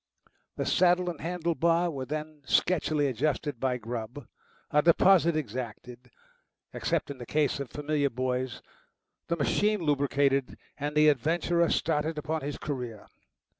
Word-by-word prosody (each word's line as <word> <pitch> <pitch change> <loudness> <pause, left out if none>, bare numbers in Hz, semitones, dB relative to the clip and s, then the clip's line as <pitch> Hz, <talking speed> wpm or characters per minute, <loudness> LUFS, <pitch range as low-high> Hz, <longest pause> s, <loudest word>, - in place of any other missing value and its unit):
The - - -2
saddle 180 0 +3
and 165 - -11
handle 170 0 -1
bar 170 +1 +2
were 135 -3 -5
then 155 0 -5
sketchily 155 -4 +2
adjusted 140 +1 -1
by 130 -1 0
Grubb, 120 +3 -6 0.5
a 150 - +4
deposit 170 0 +5
exacted, 125 -2 -6 0.6
except - - -1
in 135 - -9
the 120 - -7
case 150 -2 +1
of 140 -3 -5
familiar 150 0 -1
boys, 130 0 -3 0.6
the 170 - -1
machine 210 +8 +1
lubricated, 140 -2 +1 0.2
and 145 +1 -4
the 155 0 +5
adventurer 165 +4 +2
started 155 0 0
upon 155 +1 -2
his 145 +1 -4
career. 125 -7 -5
150 Hz, 135 wpm, -28 LUFS, 130-165 Hz, 0.6 s, deposit